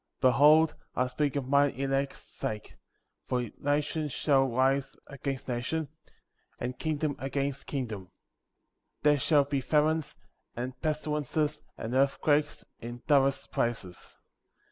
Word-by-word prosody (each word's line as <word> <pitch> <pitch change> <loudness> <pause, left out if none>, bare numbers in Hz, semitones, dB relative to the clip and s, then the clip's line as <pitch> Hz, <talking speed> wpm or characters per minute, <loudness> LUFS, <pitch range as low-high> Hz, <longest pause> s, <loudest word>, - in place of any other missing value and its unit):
29. 130 -2 +5
Behold 150 +5 +6 0.2
I 125 - +2
speak 140 +3 -1
for 140 - 0
mine 140 +2 +3
elect's 135 +1 -1
sake; 110 -6 -6 0.5
for 125 -3 -1
nation 150 +2 0
shall 135 0 +2
rise 135 +2 +1
against 140 -1 -5
nation, 130 +6 -2 0.7
and 125 +1 -4
kingdom 155 -2 -1
against 140 0 -2
kingdom; 110 -9 -4 0.9
there 145 -1 +5
shall 145 +1 +4
be 140 -1 -1
famines, 155 +2 +1 0.4
and 125 +2 -3
pestilences, 150 -1 -1 0.2
and 115 +2 -4
earthquakes, 145 +2 +2
in 120 +1 -8
divers 140 -2 +3
places. 105 -7 -3
140 Hz, 120 wpm, -29 LUFS, 130-150 Hz, 0.9 s, Behold